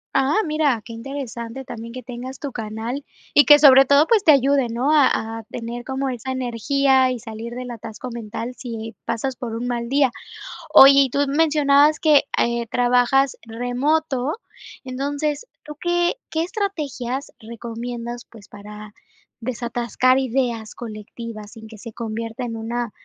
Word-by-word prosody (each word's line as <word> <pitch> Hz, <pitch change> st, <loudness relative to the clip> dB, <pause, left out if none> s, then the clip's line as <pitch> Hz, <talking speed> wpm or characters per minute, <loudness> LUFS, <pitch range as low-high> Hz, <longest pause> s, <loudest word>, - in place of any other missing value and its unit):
Ah, 270 Hz, +2 st, +2 dB
mira, 305 Hz, -6 st, +1 dB
qué 230 Hz, -, -9 dB
interesante 245 Hz, 0 st, -6 dB
también 230 Hz, -3 st, -8 dB
que 255 Hz, +1 st, -8 dB
tengas 250 Hz, +2 st, -7 dB
tu 285 Hz, -, -5 dB
canal, 225 Hz, +4 st, -5 dB, 0.3 s
y 290 Hz, -, +6 dB
que 295 Hz, -, +9 dB
sobre 270 Hz, -2 st, +8 dB
todo, 280 Hz, +3 st, +5 dB
pues, 435 Hz, +2 st, +3 dB
te 325 Hz, -, +7 dB
ayude, 275 Hz, -2 st, +3 dB
¿no? 245 Hz, +6 st, 0 dB
A 225 Hz, -6 st, +2 dB
a -, -, -10 dB
tener 235 Hz, +1 st, -6 dB
como 265 Hz, +1 st, -3 dB
esa 255 Hz, 0 st, -4 dB
energía 260 Hz, +2 st, +2 dB
y 255 Hz, -, -2 dB
salir 225 Hz, +1 st, -8 dB
del 250 Hz, 0 st, -6 dB
atasco 235 Hz, +2 st, -8 dB
mental, 230 Hz, +1 st, -6 dB
si 225 Hz, -3 st, -7 dB
pasas 255 Hz, +3 st, -2 dB
por 230 Hz, -2 st, -5 dB
un 235 Hz, +2 st, -4 dB
mal 240 Hz, -1 st, -3 dB
día. 275 Hz, -1 st, +3 dB, 0.6 s
Oye, 270 Hz, +1 st, +10 dB
y 270 Hz, -, +2 dB
tú 280 Hz, -, -2 dB
mencionabas 295 Hz, 0 st, +3 dB
que, 300 Hz, -3 st, +5 dB, 0.2 s
eh, 235 Hz, 0 st, 0 dB
trabajas 250 Hz, +3 st, +2 dB
remoto, 255 Hz, +4 st, -1 dB, 0.5 s
entonces, 285 Hz, -, -3 dB, 0.2 s
¿tú 300 Hz, 0 st, -8 dB
qué 350 Hz, +3 st, +1 dB
qué 320 Hz, 0 st, -1 dB
estrategias 290 Hz, -, -4 dB
recomiendas, 235 Hz, +1 st, -6 dB
pues, 215 Hz, -4 st, -15 dB
para 210 Hz, +1 st, -11 dB, 0.5 s
desatascar 240 Hz, +1 st, 0 dB
ideas 245 Hz, -4 st, -1 dB
colectivas, 215 Hz, -1 st, -8 dB
sin 220 Hz, 0 st, -12 dB
que 220 Hz, 0 st, -12 dB
se 230 Hz, +2 st, -9 dB
convierta 225 Hz, +2 st, -5 dB
en 230 Hz, -1 st, -5 dB
una 230 Hz, +1 st, -3 dB
245 Hz, 155 wpm, -22 LUFS, 230-275 Hz, 0.6 s, Oye